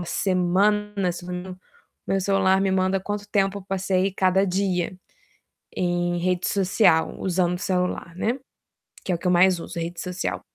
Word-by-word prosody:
de 170 - -7
semana, 195 +1 +1 1.0
meu 195 0 +1
celular 195 0 +2
me 195 - +1
manda 190 0 +1
quanto 205 +1 -5
tempo 195 0 +1
eu - - -11
passei 190 0 0
cada 190 0 +2
dia, 185 -1 -1 0.8
em 175 -1 0
rede 180 0 0
social 185 -3 +2
usando 180 -1 0
o - - -14
celular, 180 -2 -2
né, 235 +8 -1 0.7
que 185 - -1
é - - +3
o - - -12
que 180 - -6
eu - - +4
mais 180 0 +4
uso, 170 0 -7
rede 170 +1 -5
social. 180 0 -3
185 Hz, 160 wpm, -24 LUFS, 180-195 Hz, 1.0 s, eu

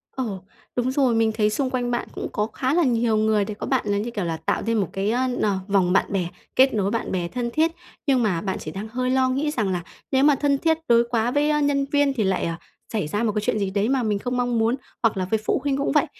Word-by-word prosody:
Ồ, 210 -8 -4 0.3
đúng 250 +1 0
rồi. 260 -3 +2
Mình 225 -1 +3
thấy 215 -1 +2
xung 260 +5 -1
quanh 245 -1 -1
bạn 240 - -2
cũng - - -4
có 210 +1 -1
khá 260 +4 -1
là 345 - +3
nhiều 235 -4 +2
người 215 -1 +2
để 210 - -5
có 205 - -6
bạn 260 -5 +1
là 200 0 +1
như, 230 +4 -3
kiểu 205 -6 -3
là, 165 -1 -2
tạo - - -1
thêm 225 -2 +1
một 195 - -2
cái, 195 +3 0
ơ, 250 +2 +1 0.2
nờ, 200 -2 +1
vòng 190 -3 +2
bạn - - +4
bè, 185 -3 0 0.3
kết 265 -1 +5
nối 200 -2 0
bạn 230 - -2
bè 180 -2 -1
thân 240 +5 -3
thiết. 325 +1 +2 0.4
Nhưng 260 -4 +3
mà 180 -6 0
bạn 190 -2 -2
chỉ 155 - -6
đang 200 +6 -6
hơi 255 +3 -2
lo 260 0 +3
nghĩ 280 +4 0
rằng 215 -9 -1
là 175 -2 -2 0.3
nếu 265 +1 +3
mà 295 -1 +6
thân 280 0 +1
thiết 320 +2 +2
đối 235 0 +5
quá 235 0 +1
với, 290 +3 +2
a, 300 0 +2
nhân 285 -1 +1
viên 285 -1 +3
thì 230 -5 0
lại, 190 -1 0
ờ, 165 - -1 0.4
xảy 210 -8 -1
ra 205 +8 -1
một 220 - +2
cái 210 - +1
chuyện 210 0 0
gì 195 - 0
đấy 200 +3 0
mà 265 -2 +1
mình 210 -2 0
không 250 +3 -2
mong 245 -2 +1
muốn, 225 +2 +2 0.3
hoặc 225 -3 +2
là 185 - 0
với 220 +4 0
phụ - - +1
huynh 280 -1 0
cũng 280 - 0
vậy. - - +3
230 Hz, 290 wpm, -23 LUFS, 205-260 Hz, 0.4 s, mà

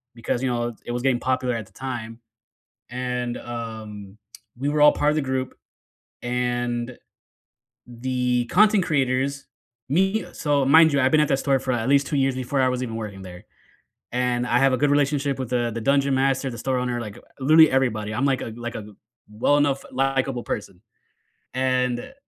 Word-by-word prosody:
because, 120 +2 -3
you 130 - +1
know, 120 -1 -1
it 120 - -10
it - - -3
was 120 0 -2
getting 130 -3 +2
popular 130 -1 -1
at 110 -3 -5
the 95 - -25
time, 120 -2 -6 0.7
and, 125 -1 -3
um, 110 -4 -8 0.4
we 140 +3 -1
were 150 0 0
all 150 - +8
part 150 - +1
of 150 - -1
the 155 - +1
group, 130 -1 -3 0.7
and 120 0 -2 0.9
the 125 0 -1
content 205 - +4
creators, 135 -2 0 0.4
me 190 +8 +1
so, 145 -3 +1
mind 160 +2 +6
you, 140 - +3
I'd 130 +1 +3
been 155 - +5
at 150 - +2
that 135 - +2
store 135 -2 +1
for 130 - -2
at 115 +1 -1
least 140 0 +3
2 145 - -2
years 135 -1 +2
before 130 +1 -1
I 130 - +3
was 125 0 -2
even 115 -3 -5
working 105 -4 -6
there, 90 -1 -11 0.7
and 125 0 0
I 120 - +2
have 135 0 +4
a - - +2
good 145 +1 +2
relationship 145 -1 +1
with 130 -3 -4
the 120 -1 0
the 115 - -3
dungeon 140 +1 +2
master, 135 +1 +1
the 120 - -7
store 130 +3 -1
owner, 125 -1 -2
like, 105 -2 -8
uh - - -17 0.2
literally 155 +3 +6
everybody, 110 -5 0
I'm 120 - -1
like 135 -2 +1
a 115 - -6
like 120 0 -6
a 105 - -7 0.4
well-enough, 140 +5 +1
likable 135 -1 0
person. 100 -3 -5 0.7
And 125 - -1
130 Hz, 190 wpm, -23 LUFS, 120-135 Hz, 0.9 s, all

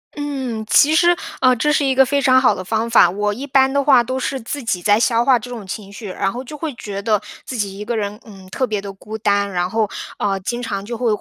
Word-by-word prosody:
嗯， 265 -6 -4
其 300 +2 +5
实， 345 +2 +4 0.3
呃， 255 -1 +5
这 300 +6 +1
是 300 - +2
一 265 - +1
个 265 0 +6
非 280 +2 0
常 260 -1 +5
好 260 - +4
的 185 - -6
方 220 +4 -1
法。 225 -6 +6
我 205 +3 -1
一 270 +7 -7
般 265 0 +3
的 280 - +2
话 260 -4 +5
都 255 +2 -3
是 265 +1 -2
自 260 +4 -5
己 190 -6 -1
在 205 +2 +3
消 235 -1 +2
化 260 -3 +4
这 245 +3 -10
种 230 -5 -7
情 195 +1 -7
绪， 215 +1 -10
然 195 +1 -2
后 250 +2 -6
就 300 +4 -9
会 315 +1 -4
觉 200 -3 -6
得 210 0 +1 0.3
自 255 - -5
己 200 -2 -3
一 - - -4
个 230 +1 -3
人， 205 0 -3
嗯， 195 -4 -14
特 260 +5 -1
别 210 -2 -2
的 200 0 -7
孤 215 +3 -8
单， 200 -2 +1
然 180 -1 0
后， 220 -1 0 0.3
啊， 195 -1 0
经 240 +6 -4
常 200 -4 -4
就 235 +1 -5
会 245 - 0
230 Hz, 290 characters per minute, -19 LUFS, 205-260 Hz, 0.3 s, 个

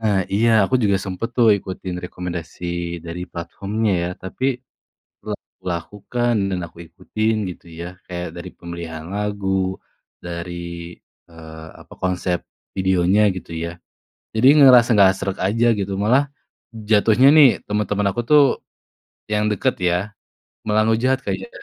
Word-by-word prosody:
Ah 105 -3 +2
iya, 110 +4 +3 0.2
aku 115 - -1
juga 100 -2 +3
sempat 95 +4 -4
tuh 120 -2 +5
ikutin 95 -1 -6
rekomendasi 90 -1 -6 0.4
dari 85 +1 -6
platformnya 100 +6 -2
ya 85 - -1
tapi 95 +7 -6 0.8
lep - - -5 0.3
lakukan 105 +7 -2 0.2
dan 90 - -1
aku 85 - -22
ikutin 110 +6 -2 0.2
gitu 90 - -10
ya 85 - -5 0.2
kayak 90 -1 -5
dari - - -7
pemilihan 85 -2 -7
lagu, 100 -1 -3 0.8
dari, 85 0 -5 0.8
eee, 80 -1 -11 0.2
apa - - -15
konsep 90 -1 0 0.4
videonya 95 +1 +3
gitu 90 - -8
ya. 85 - -3 0.7
Jadi 110 +3 +3
ngerasa 125 -4 +8
nggak 95 -2 +7
sreg 95 -1 -3
aja 115 +4 +1
gitu 100 0 -2
malah 125 +7 +4 0.7
jatuhnya 110 +4 +5
nih 150 -2 +9 0.2
teman-teman 105 -1 0
aku 110 - -2
tuh, 150 -1 +8 0.9
yang 105 0 +2
dekat 130 +5 0
ya 85 - +2 0.7
malah 110 0 +3
ngehujat 125 +4 +2
kayak, 240 - -3
100 Hz, 135 wpm, -21 LUFS, 90-110 Hz, 0.9 s, nih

